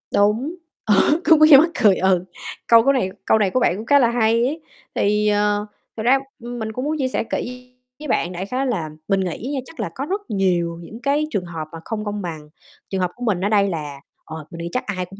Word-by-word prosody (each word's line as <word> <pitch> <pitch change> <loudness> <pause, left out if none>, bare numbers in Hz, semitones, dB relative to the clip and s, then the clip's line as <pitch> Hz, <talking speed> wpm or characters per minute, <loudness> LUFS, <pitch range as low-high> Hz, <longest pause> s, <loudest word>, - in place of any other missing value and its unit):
Đúng, 220 +11 +2 0.3
ờ, 210 -2 +4 0.3
cũng 320 -1 +7
nghe 310 0 +7
như 275 - +12
mắc 325 +4 +5
cười, 200 -3 +6
ừ, 185 -1 +2 0.4
câu 230 -1 +7
của 275 - +4
này 220 -8 0 0.2
câu 220 - +4
này 200 - +2
của 255 - +1
bạn 180 - +2
cũng 215 - -7
khá 285 +3 +5
là 235 -3 +4
hay 230 0 +2
ấy. 310 +5 -3 0.3
Thì, 210 +1 +1
ờ, 205 0 +1 0.3
thực 220 - -3
ra, 265 +3 +4 0.2
ừm, 240 0 -6
mình 220 0 -4
cũng 255 +4 -4
muốn 310 +1 -1
chia 265 -3 0
sẻ 255 - -1
kỹ 250 0 -5 0.3
với 300 - -7
bạn 180 -7 0
đại 180 +2 -5
khái 255 +5 -2
là 175 -10 -2 0.2
mình 195 -1 +2
nghĩ 190 - -3
nha, 270 - -1
chắc 325 - -15
là - - -2
có 270 - -3
rất 395 +6 -2
nhiều 175 -4 0
những 215 +7 -10
cái 285 +2 +1
trường 195 -5 -2
hợp 160 -3 -6
mà 165 - -8
không 220 -1 -4
công 205 0 -3
bằng, 155 -4 -7 0.4
trường 190 -1 -2
hợp 180 - 0
của 245 - -9
mình 200 -6 0
ở - - +1
đây 200 -2 +3
là 150 -5 -5 0.3
ờ, 160 -1 -8
mình 170 - -9
nghĩ 170 - -4
chắc 250 - -1
ai 185 -3 -3
cũng 195 +2 -14
210 Hz, 255 wpm, -21 LUFS, 185-250 Hz, 0.4 s, như